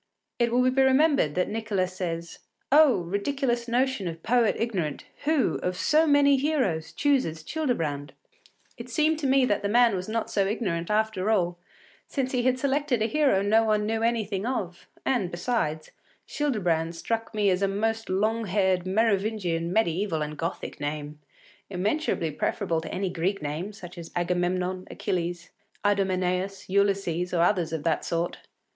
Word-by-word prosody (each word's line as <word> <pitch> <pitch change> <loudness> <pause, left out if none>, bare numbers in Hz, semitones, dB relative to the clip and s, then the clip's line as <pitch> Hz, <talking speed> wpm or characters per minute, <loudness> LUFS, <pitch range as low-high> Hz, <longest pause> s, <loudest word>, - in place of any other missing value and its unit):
It 235 -1 +2
will 250 +1 +3
be 270 +1 +2
remembered 265 - +3
that 180 - +1
Nicolas 210 -4 -2
says: 170 -2 -4 0.3
“Oh! 290 - +6
ridiculous 235 - -1
notion 245 -4 0
of 165 -1 -6
poet 240 -1 +3
ignorant 185 -11 -2 0.2
Who, 305 -3 +2
of 180 0 -2
so 315 - +3
many 285 -1 +5
heroes, 260 - 0
chooses 255 - 0
Childebrand!” 155 - -2 0.6
It 235 +1 -9
seemed 305 +6 +1
to 285 - -1
me 265 0 +4
that 205 -4 0
the 200 - -1
man 235 -1 +4
was 185 +2 -4
not 225 0 -2
so 200 -2 +1
ignorant 185 -6 -2
after 215 -2 0
all, 175 -5 +1 0.5
since 265 -2 -2
he 250 - +1
had 255 +1 +2
selected 275 -3 0
a - - +2
hero 265 -6 +2
no 220 +2 +4
one 215 -1 +1
knew 225 +1 -1
anything 220 -4 0
of; 190 -9 -4 0.2
and, 235 -9 +1
besides, 175 -5 -2 0.4
Childebrand 175 - 0
struck 225 +5 -3
me 205 -2 +3
as 185 +1 0
a 195 - +3
most 225 +3 -1
long 215 +4 0
haired, 190 -2 +1
Merovingian, 195 -5 0
mediæval, 180 -4 +1
and 150 0 -7
Gothic 165 +3 -5
name, 145 0 -4 0.5
immeasurably 195 - -1
preferable 160 +2 -1
to - - -7
any 190 -1 -2
Greek 185 +4 -1
name, 155 +7 -3
such 180 -4 -10
as 165 - -8
Agamemnon, 180 +1 -1
Achilles, 175 -1 -3 0.3
Idomeneus, 190 -1 0
Ulysses, 195 -3 +1
or 170 - +3
others 175 -3 +1
of 160 -2 -3
that 165 - 0
sort. 170 +1 -2
200 Hz, 160 wpm, -26 LUFS, 175-235 Hz, 0.6 s, Oh